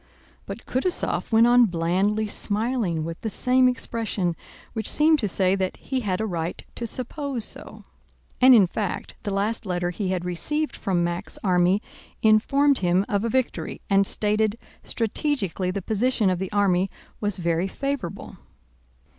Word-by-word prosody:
But - - -7
Kutúzov 305 +3 -1
went 225 +1 +6
on 245 0 +6
blandly 190 +5 0
smiling 210 -5 -1
with 165 +1 -6
the 220 - -2
same 255 +4 +3
expression, 220 -8 -2 0.4
which 220 -2 +3
seemed 310 +1 +4
to 215 - 0
say 190 0 +2
that 190 -1 -1
he 265 - -3
had 195 -6 -2
a 220 - -1
right 170 -4 -4
to 235 - -5
suppose 255 0 -4
so. - - -8 0.6
And, 255 0 +9
in 205 -4 +7
fact, 195 +2 -4
the 205 - -4
last 205 +4 -1
letter 175 -3 -2
he 195 +2 -3
had 185 -1 -2
received 300 - -2
from 180 -3 0
Mack's 175 +3 -3
army 180 +1 +3 0.4
informed 275 +6 +4
him 180 +1 +2
of 200 0 0
a 230 - 0
victory 260 +1 -2
and 195 0 +4
stated 215 +1 +1 0.2
strategically 220 - -1
the 190 +1 -3
position 220 -1 +1
of 180 - -1
the 190 -1 -4
army 195 -2 +2 0.3
was 205 -2 0
very 170 +1 0
favorable. 275 -4 -4
205 Hz, 155 wpm, -24 LUFS, 185-240 Hz, 0.6 s, And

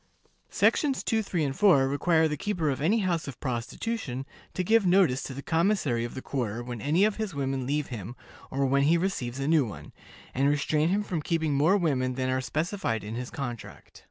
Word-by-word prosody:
Sections 275 -4 +2
2, 225 -2 +1
3, 180 -6 -1
and 135 -2 -1
4 155 -9 +5
require 160 +3 +2
the 150 - -2
keeper 165 -2 -1
of 135 - -4
any 210 +9 +2
house 175 -5 -1
of 135 - -8
prostitution 130 - -3 0.3
to 185 - 0
give 225 +4 +4
notice 180 -8 +3
to - - -6
the 140 - -7
commissary 165 - +1
of 120 - -5
the 130 - -6
quarter 120 -4 -3
when 120 -2 -6
any 165 +8 +3
of 215 -1 0
his 215 -7 -3
women 135 -2 -2
leave 145 +1 -1
him, 115 -1 -6 0.3
or 135 +1 0
when 135 +1 +2
he 155 +5 +4
receives 140 -9 -2
a 135 - -2
new 160 -2 +4
one, 110 -5 -8 0.4
and 135 +2 +2
restrain 150 +2 +1
him 205 +3 +1
from 175 -6 -3
keeping 160 -2 0
more 155 +8 +4
women 130 -8 0
than 130 0 -1
are 130 0 0
specified 155 - -2
in 105 +2 -6
his 125 +1 -4
contract. 120 -5 -7
145 Hz, 210 wpm, -27 LUFS, 130-180 Hz, 0.4 s, 4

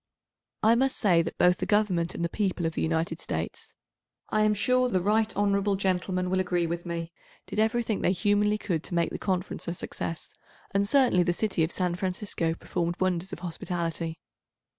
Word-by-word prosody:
I 220 +2 +6
must 260 +3 +2
say 180 -6 +4
that 165 - -5
both 180 0 +4
the - - -3
Government 190 -6 +1
and 170 - -1
the - - -1
people 185 -3 -1
of 165 - -1
the - - -2
United 165 0 -1
States—I 215 - -5
am 215 0 +3
sure 250 +4 +2
the 185 - +2
right 215 +4 +2
hon. 200 0 +2
Gentleman 185 -1 0
will 190 - +2
agree 180 -2 +1
with 170 +1 -4
me—did 170 +4 -7
everything 220 -1 +1
they - - +3
humanly 205 +3 +2
could 170 -6 -2
to 175 - -3
make 170 -1 +1
the - - -5
Conference 185 -2 -2
a 170 - -2
success, 165 -1 -5 0.4
and 200 +1 +1
certainly 255 -9 +4
the 175 0 +2
city 190 -3 +1
of 160 - 0
San 180 -2 0
Francisco 180 -2 -2
performed 170 0 -2
wonders 185 -1 0
of - - -7
hospitality. 165 -1 -3
185 Hz, 185 wpm, -27 LUFS, 170-210 Hz, 0.4 s, I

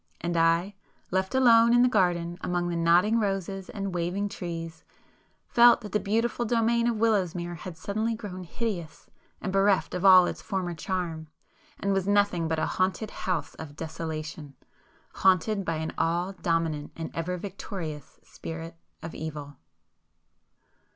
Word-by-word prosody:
And 170 0 -2
I, 165 +4 +2 0.4
left 190 +5 0
alone 235 -2 +6
in 240 - +6
the - - +5
garden 175 -6 +1
among 175 0 -1
the 170 - -2
nodding 175 +7 +4
roses 195 -2 -2
and 195 -2 -4
waving 180 +4 -1
trees, 165 -3 -6 0.6
felt 240 0 +6
that 210 - -8
the 210 - +1
beautiful 225 +4 0
domain 235 0 +2
of 235 - +1
Willowsmere 185 -6 0
had 175 0 -8
suddenly 215 +6 -2
grown 190 -5 -7
hideous 180 -4 -5 0.3
and 190 - -3
bereft 195 0 +2
of 180 0 -3
all 185 -2 +8
its - - -4
former 185 -4 -3
charm, 165 -2 -3 0.5
and 200 0 0
was 195 -1 0
nothing 200 -5 +2
but 160 0 -1
a 160 - +1
haunted 190 +5 -1
house 165 -6 -3
of 145 -2 -8
desolation,—haunted 160 +5 -3
by 165 -3 -1
an 160 0 -4
all 175 +3 0
dominant 165 -5 -1
and 165 -1 -6
ever 180 +2 -2
victorious 175 -6 -7
Spirit 165 0 -8 0.3
of 165 - -6
Evil. 150 -3 -7
180 Hz, 145 wpm, -27 LUFS, 165-205 Hz, 0.6 s, all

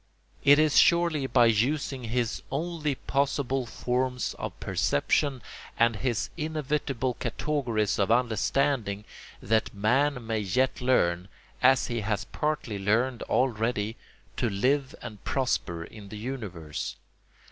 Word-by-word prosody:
It 145 0 +7
is 155 -1 +5
surely 170 -5 +3
by 120 -2 +5
using 125 +3 +1
his 120 0 -1
only 155 0 -2
possible 135 -1 -1
forms 125 +1 -1
of - - -5
perception 130 - 0 0.3
and 115 -1 +3
his 120 -1 -1
inevitable 150 -5 -2
categories 120 -4 -1
of 100 - +2
understanding 115 -2 +1 0.4
that 110 +2 +1
man 125 +5 +1
may 110 -1 -1
yet 125 +7 0
learn, 90 -8 +2 0.3
as 130 +1 +5
he 120 -2 -2
has 105 -1 -1
partly 150 -9 -2
learned 115 +5 +1
already, 115 -3 0 0.4
to 120 - +1
live 130 +7 0
and 110 -4 -9
prosper 105 -11 -1
in 100 +3 -11
the 105 - -7
universe. 105 - -5
125 Hz, 120 wpm, -28 LUFS, 110-140 Hz, 0.4 s, It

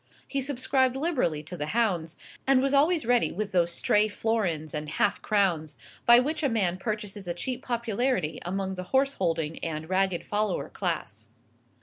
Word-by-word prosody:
He 275 - -2
subscribed 260 -1 +1
liberally 265 - 0
to 170 +4 -7
the 150 -3 -3
hounds, 175 -8 0 0.3
and 270 -1 +5
was 275 +1 +1
always 305 +2 +3
ready 245 0 +3
with 205 +2 -3
those 175 -2 +2
stray 210 +5 +3
florins 205 -8 -1
and 150 -1 -4
half 200 +6 0
crowns 175 -8 0 0.3
by 240 0 +9
which 300 +5 +1
a 285 - +2
man 190 -6 +1
purchases 210 -2 -4
a 175 - -2
cheap 250 +7 -3
popularity 235 - -1
among 190 +1 -2
the 185 -1 -5
horse 275 +1 +3
holding 165 - -1
and 160 -1 -3
ragged 190 -2 +1
follower 210 0 -1
class. - - -4
205 Hz, 165 wpm, -27 LUFS, 175-255 Hz, 0.3 s, by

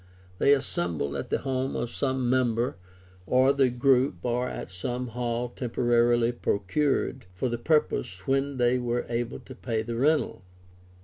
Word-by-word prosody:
They 140 - +6
assembled 85 - -1
at - - -4
the - - +1
home 130 0 -2
of 120 - -2
some 130 -2 -1
member 120 -2 +1 0.5
of 130 +2 +4
the 135 -2 +4
group^or 125 -1 +1
at - - -7
some 125 +7 -3
hall 120 +1 -2
temporarily 120 -1 +2
procured 130 +3 -1
for 90 +8 -3
the 120 0 -3
purpose 90 - 0
when 135 0 0
they 125 0 +3
were 120 0 -1
able 120 0 -2
to 130 - -11
pay 115 -4 -2
the 115 +1 -4
rental. 145 -5 +1
120 Hz, 145 wpm, -27 LUFS, 115-130 Hz, 0.5 s, They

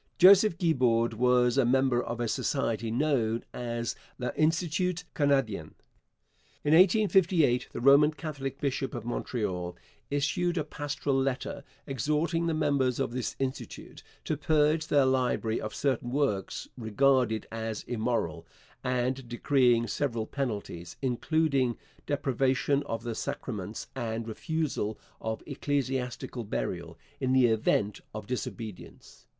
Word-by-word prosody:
Joseph 190 0 +7
Guibord 125 -9 +2
was 125 +2 +3
a - - +5
member 130 0 +3
of 120 0 -5
a 120 - 0
society 115 -3 -1
known 120 -3 +1
as 120 -1 -3 0.2
L'Institut 165 +6 0
Canadien. 135 - 0 0.9
In 145 - +3
1858 180 - +4
the - - -5
Roman 140 +3 +7
Catholic 140 -4 -5
bishop 135 -2 -2
of 115 -2 -5
Montreal 95 -7 -3 0.3
issued 155 +5 0
a 155 - +1
pastoral 145 -2 -2
letter 135 +1 -2 0.2
exhorting 155 +5 0
the 165 - 0
members 140 -5 +1
of 135 - 0
this 125 0 -3
institute 130 -1 -5 0.2
to 155 - 0
purge 155 +1 +2
their 140 -2 +4
library 125 -4 +1
of 110 - -5
certain 130 -3 0
works 125 -8 -1
regarded 120 0 +2
as 110 -1 -4
immoral, 115 -8 -2 0.4
and 125 0 -1
decreeing 120 -1 +3
several 120 -3 -1
penalties, 100 -10 -4
including 135 -1 +1 0.3
deprivation 135 0 +1
of 115 0 -3
the 120 -1 -3
sacraments - - -5
and 115 0 -3
refusal 130 -3 -2 0.2
of 110 0 -3
ecclesiastical 130 -4 -2
burial, 105 - -4 0.2
in 130 0 +1
the 130 -1 +6
event 110 -2 +1
of 110 -1 -5
disobedience. 115 -3 -7
130 Hz, 120 wpm, -29 LUFS, 115-145 Hz, 0.9 s, Joseph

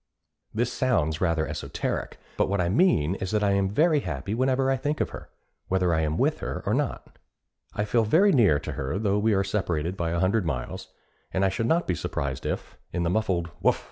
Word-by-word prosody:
This 120 +2 -1
sounds 80 - +1
rather 85 -3 +1
esoteric, - - -4 0.2
but - - +1
what 100 0 0
I 85 -1 +1
mean 95 - +3
is 95 -1 -4
that 105 0 +1
I 100 - +3
am 100 -1 +2
very 155 - +3
happy 95 - -4
whenever 130 +2 +2
I - - +3
think 145 +4 -2
of - - -1
her, - - -9 0.4
whether 90 -2 +1
I 80 - +2
am 80 0 -1
with - - +1
her - - -4
or - - +1
not. - - -3 0.6
I 105 - 0
feel 115 +2 +2
very 175 - +4
near 105 - +4
her 70 +6 -3
though 100 -1 +1
we 110 0 +2
are 95 - +2
separated 90 -4 -1
by 85 -3 -2
a 85 +1 -1
hundred 95 +4 +2
miles; 65 -8 -4 0.4
and 95 +1 +1
I - - +3
should 115 +4 -1
not 170 +6 +2
be 90 - 0
surprised 70 -5 -3
if, - - -5
in 85 - -1
the 85 - 0
muffled 90 -5 0
'Woof! - - +3
95 Hz, 215 wpm, -26 LUFS, 85-115 Hz, 0.6 s, very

